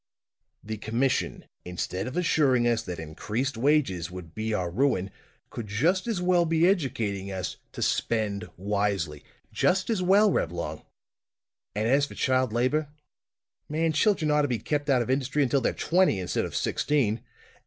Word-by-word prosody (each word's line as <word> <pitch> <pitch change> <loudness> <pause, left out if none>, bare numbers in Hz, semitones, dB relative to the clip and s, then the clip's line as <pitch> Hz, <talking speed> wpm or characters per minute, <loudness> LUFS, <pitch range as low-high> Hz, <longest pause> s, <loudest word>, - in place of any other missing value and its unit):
"The 110 +1 -5
commission, 120 +5 -1 0.2
instead 90 +2 -4
of 130 - -5
assuring 140 -8 +3
us 115 -1 +2
that 90 -2 -6
increased 105 - -3
wages 115 - +1
would 90 -3 -9
be 110 +1 -3
our 90 -5 -1
ruin, 100 -4 +1 0.4
could 115 -3 -6
just 165 - +1
as 225 -6 -1
well 180 -1 +3
be 165 +1 +3
educating 115 - -1
us 95 -1 -4 0.2
to - - -3
spend 110 -2 -1
wisely! 100 -6 -1 0.3
Just 185 +4 +2
as 210 -5 0
well, 200 +3 +5
Reblong! 85 - -2 0.9
And 105 +2 0
as 140 +4 +3
for - - -11
child 130 -2 +1
labor 130 +6 +1 0.8
man, 160 +2 +1
children 155 -2 +2
ought 150 0 +4
to 145 - +1
be 125 -3 0
kept 145 +4 -2
out 130 -3 +4
of 125 - -2
industry 135 +2 +1
until 135 +1 +2
they're - - +1
twenty, 175 - +2
instead 90 -1 -1
of - - -7
sixteen! 125 -7 +1
125 Hz, 160 wpm, -27 LUFS, 100-150 Hz, 0.9 s, well